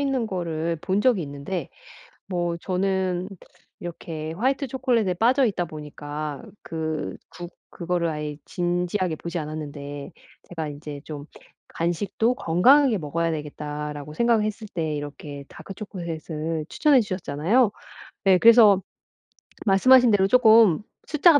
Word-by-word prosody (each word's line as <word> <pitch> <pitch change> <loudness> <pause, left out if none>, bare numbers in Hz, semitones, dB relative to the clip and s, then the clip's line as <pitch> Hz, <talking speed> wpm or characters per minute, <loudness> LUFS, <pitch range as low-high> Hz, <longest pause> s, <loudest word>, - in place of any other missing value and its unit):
있는 270 -4 0
거를 170 -4 -2
본 190 +4 0
적이 225 -5 +3
있는데 145 +3 -5 0.6
뭐 175 -2 -1
저는 185 0 -1 0.5
이렇게 160 -2 -6
화이트 265 - 0
초콜릿에 245 -7 +1
빠져 250 +7 +3
있다 195 -6 0
보니까 150 -1 -6 0.2
그 160 -1 -4 0.2
구 175 -1 -8 0.2
그거를 175 -1 -1
아예 150 -1 -4
진지하게 175 0 -1
보지 170 +3 -5
않았는데 145 -1 -6 0.4
제가 160 -3 -4
'이제 145 0 -8
좀 145 -2 -7 0.4
간식도 185 +8 0
건강하게 250 - +4
먹어야 165 +1 -1
되겠다.'라고 150 -1 -5
생각을 235 -2 +3
했을 215 +1 -4
때 160 -3 -2
이렇게 145 0 -7
다크 195 - -10
초콜릿을 165 -5 -5
추천해 295 - +4
주셨잖아요. 195 - +1 0.5
네. 190 -2 +5
그래서 220 -3 +7 0.9
말씀하신 245 +5 +6
대로 195 -2 +4
쪼끔 220 -6 +6 0.2
숫자가 305 0 +5
175 Hz, 295 characters per minute, -24 LUFS, 155-215 Hz, 0.9 s, 그래서